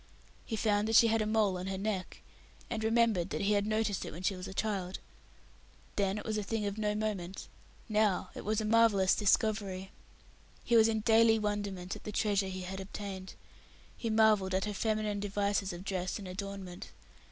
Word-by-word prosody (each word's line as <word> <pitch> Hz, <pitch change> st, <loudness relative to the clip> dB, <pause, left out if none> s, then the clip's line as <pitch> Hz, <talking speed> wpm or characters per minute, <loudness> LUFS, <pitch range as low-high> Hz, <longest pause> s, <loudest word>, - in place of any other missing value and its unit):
He 225 Hz, -, -2 dB
found 210 Hz, -1 st, +1 dB
that 225 Hz, -, +1 dB
she 230 Hz, +1 st, +7 dB
had 225 Hz, 0 st, +2 dB
a 215 Hz, -, 0 dB
mole 210 Hz, -4 st, +2 dB
on 185 Hz, -, -5 dB
her 190 Hz, 0 st, -3 dB
neck, 195 Hz, -2 st, -3 dB, 0.5 s
and 220 Hz, -2 st, -2 dB
remembered 220 Hz, -5 st, +2 dB
that -, -, -3 dB
he 205 Hz, +1 st, +2 dB
had 205 Hz, 0 st, +1 dB
noticed 215 Hz, -2 st, 0 dB
it -, -, -5 dB
when 170 Hz, +4 st, -8 dB
she 195 Hz, -, +1 dB
was 185 Hz, +1 st, -7 dB
a -, -, -7 dB
child. 190 Hz, -3 st, -2 dB, 1.0 s
Then 200 Hz, 0 st, +1 dB
it -, -, -6 dB
was 215 Hz, -1 st, -1 dB
a -, -, -1 dB
thing 210 Hz, +1 st, -2 dB
of 200 Hz, +1 st, -3 dB
no 210 Hz, -1 st, 0 dB
moment, 195 Hz, -4 st, -3 dB, 0.4 s
now 210 Hz, -4 st, +1 dB
it -, -, -7 dB
was 215 Hz, +1 st, 0 dB
a 215 Hz, -, -2 dB
marvellous 215 Hz, -4 st, +4 dB
discovery. 200 Hz, -2 st, +1 dB, 0.7 s
He 235 Hz, -, +2 dB
was 225 Hz, -1 st, +7 dB
in 220 Hz, -1 st, 0 dB
daily 225 Hz, 0 st, +5 dB
wonderment 205 Hz, -3 st, -3 dB
at -, -, -11 dB
the 210 Hz, -, -5 dB
treasure 200 Hz, -2 st, +1 dB
he 185 Hz, 0 st, -5 dB
had 190 Hz, +1 st, -5 dB
obtained. 190 Hz, -1 st, -7 dB, 0.6 s
He 230 Hz, -, -3 dB
marvelled 215 Hz, -4 st, +3 dB
at 190 Hz, -, 0 dB
her 210 Hz, -, -3 dB
feminine 215 Hz, -1 st, -1 dB
devices 200 Hz, -1 st, -1 dB
of 175 Hz, +1 st, -7 dB
dress 185 Hz, -2 st, -2 dB
and 200 Hz, -3 st, -8 dB
adornment. 190 Hz, -1 st, -6 dB
205 Hz, 200 wpm, -32 LUFS, 190-215 Hz, 1.0 s, she